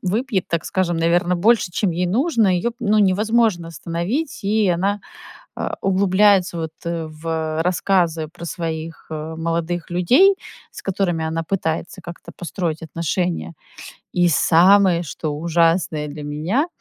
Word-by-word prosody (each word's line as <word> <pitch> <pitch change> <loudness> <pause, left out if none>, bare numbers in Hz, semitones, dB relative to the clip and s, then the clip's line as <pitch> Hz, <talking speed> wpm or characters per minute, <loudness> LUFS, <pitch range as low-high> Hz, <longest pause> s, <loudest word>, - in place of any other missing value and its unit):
выпьет, 205 +1 -1
так 170 -2 -1
скажем, 175 -3 0
наверно, 175 +2 +2
больше, 205 -1 +3
чем 195 +1 0
ей 175 +2 -1
нужно, 230 - +2
её, 235 +7 -1
ну, 215 -1 +2
невозможно 210 -2 +2
остановить, 170 - -3
и 210 0 +2
она, 195 +4 0 0.6
а, - - -4
углубляется, 195 -1 +3
вот, 160 -1 -4
э, 165 -1 -3
в 160 0 -3
рассказы 175 -3 +1
про 170 +2 -13
своих, 165 -2 -5
э, 160 +1 -5
молодых 170 +1 -2
людей, 255 - +4 0.4
с - - -10
которыми 180 -4 -1
она 165 +1 -2
пытается 175 +1 -3
как-то 170 0 -10
построить 170 -3 -3
отношения. 165 - -2 0.6
И 175 0 +3
самое, 175 +3 +5
что 155 0 -5
ужасное 165 -2 +1
для 145 0 -8
меня- 165 - -1
175 Hz, 135 wpm, -21 LUFS, 165-195 Hz, 0.6 s, самое